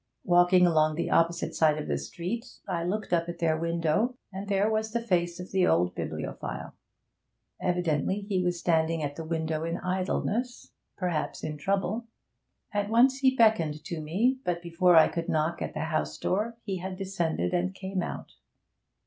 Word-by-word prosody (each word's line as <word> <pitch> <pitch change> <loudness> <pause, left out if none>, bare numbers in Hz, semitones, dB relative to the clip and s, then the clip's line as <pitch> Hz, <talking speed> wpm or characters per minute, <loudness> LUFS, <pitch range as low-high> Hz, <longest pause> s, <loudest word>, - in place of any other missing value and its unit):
Walking 175 +1 +5
along 155 -2 +3
the 170 - -2
opposite 170 +1 +2
side 155 -2 +3
of 155 - -4
the 70 - -1
street, 205 - -5
I 175 -3 -1
looked 200 +3 -2
up 170 0 +1
at 170 - -5
their 165 -2 +2
window, 170 +8 0 0.2
and 195 +1 -6
there 200 +1 +2
was 220 0 -1
the 235 - +1
face 175 -6 0
of 180 - -8
the 185 -1 +3
old 90 +1 +2
bibliophile. - - -5 0.9
Evidently 180 +1 0
he 200 -2 -1
was 175 -1 0
standing 165 -1 +1
at 145 0 -3
the 165 - -5
window 160 -1 -2
in 165 +1 -2
idleness, 195 +7 -2 0.3
perhaps 175 -5 -2
in 155 - -3
trouble. 200 +6 -1 0.7
At 205 0 0
once 255 +4 +4
he 265 -1 +3
beckoned 170 - +3
to 170 -2 -5
me; 220 +13 +1
but 175 -1 -2
before 170 +1 +3
I 160 - +8
could 170 -1 -4
knock 155 +2 0
at - - -4
the 155 - -2
house 155 0 -2
door 220 +5 -1
he 195 -3 -3
had 185 +1 -5
descended, 170 - -1
and 185 +2 0
came 190 -1 -3
out. - - -6
175 Hz, 175 wpm, -28 LUFS, 160-200 Hz, 0.9 s, I